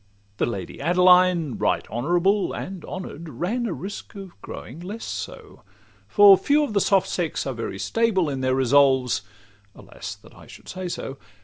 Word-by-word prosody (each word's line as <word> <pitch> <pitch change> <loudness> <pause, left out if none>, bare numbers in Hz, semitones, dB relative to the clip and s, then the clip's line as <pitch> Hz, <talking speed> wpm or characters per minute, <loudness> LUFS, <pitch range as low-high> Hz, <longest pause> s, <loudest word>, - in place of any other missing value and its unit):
The - - +1
Lady 100 -6 -6
Adeline, 180 -4 +4
right - - 0
honourable; 175 - +1
And 185 -3 -6
honour'd, 170 -3 -7
ran 230 +10 -2
a 190 - -2
risk 195 +4 -8
of 195 -2 -9
growing 130 +8 -9
less 200 +6 -7
so; - - -7 0.5
For 205 -2 +8
few 295 +1 +3
of 280 - -3
the 200 - +2
soft 195 -1 +3
sex 170 -4 -2
are 135 - -2
very 115 -4 -5
stable 215 - +1
In 135 -2 -3
their 130 0 +1
resolves—alas! 120 -7 -1
that - - -19
I - - -15
should - - -14
say 185 -1 -5
so! 135 -5 -6
175 Hz, 165 wpm, -24 LUFS, 130-195 Hz, 0.5 s, For